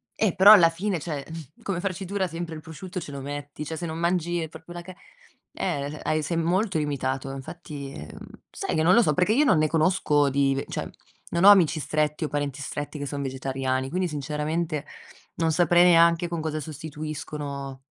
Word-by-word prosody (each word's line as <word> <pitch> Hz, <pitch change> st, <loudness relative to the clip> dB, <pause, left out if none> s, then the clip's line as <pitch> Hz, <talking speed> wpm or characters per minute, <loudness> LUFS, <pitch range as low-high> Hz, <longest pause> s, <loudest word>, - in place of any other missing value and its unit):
eh, 210 Hz, -5 st, +1 dB
però 200 Hz, +3 st, +9 dB
alla 170 Hz, -6 st, +7 dB
fine, 180 Hz, +1 st, -2 dB
cioè, 145 Hz, -3 st, -5 dB
mhmm, 160 Hz, -3 st, -10 dB
come 190 Hz, -4 st, -2 dB
farcitura 190 Hz, 0 st, -2 dB
sempre 165 Hz, -1 st, -5 dB
il 155 Hz, -, -8 dB
prosciutto 175 Hz, +3 st, -7 dB
ce 150 Hz, -, -8 dB
lo 140 Hz, -, -6 dB
metti, 145 Hz, +1 st, -6 dB
cioè 160 Hz, -, -4 dB
se 170 Hz, -, -4 dB
non 160 Hz, 0 st, -4 dB
mangi 175 Hz, -1 st, 0 dB
proprio 160 Hz, +2 st, -11 dB
la 175 Hz, -, -6 dB
ca 185 Hz, +2 st, -10 dB, 0.6 s
eh, 145 Hz, -4 st, -3 dB
hai 155 Hz, 0 st, 0 dB
sei 165 Hz, +2 st, -2 dB
molto 185 Hz, +3 st, +1 dB
limitato, 135 Hz, -3 st, -2 dB
infatti 145 Hz, 0 st, -8 dB, 0.6 s
sai -, -, -3 dB
che 155 Hz, -, +2 dB
non 180 Hz, -, +5 dB
lo 235 Hz, -, +7 dB
so? 155 Hz, -9 st, +2 dB
Perché 180 Hz, +7 st, +2 dB
io 285 Hz, -, +4 dB
non 255 Hz, -, +4 dB
ne 155 Hz, -, +3 dB
conosco 155 Hz, -3 st, +2 dB
di 135 Hz, 0 st, +2 dB
ve 135 Hz, -, -3 dB
cioè, -, -, -4 dB, 0.4 s
non 170 Hz, +1 st, 0 dB
ho -, -, +11 dB
amici 180 Hz, -6 st, +6 dB
stretti 150 Hz, +1 st, -1 dB
o -, -, -1 dB
parenti 145 Hz, -1 st, -3 dB
stretti 145 Hz, +1 st, -5 dB
che 145 Hz, -, -3 dB
son 140 Hz, 0 st, -4 dB
vegetariani, 130 Hz, 0 st, -2 dB
quindi 180 Hz, +4 st, -1 dB
sinceramente 150 Hz, +1 st, -2 dB, 0.5 s
non 165 Hz, 0 st, +1 dB
saprei 175 Hz, +1 st, +4 dB
neanche 170 Hz, 0 st, +5 dB
con 170 Hz, -1 st, -3 dB
cosa 155 Hz, -1 st, -2 dB
sostituiscono 145 Hz, -2 st, -6 dB
155 Hz, 195 wpm, -25 LUFS, 145-175 Hz, 0.6 s, ho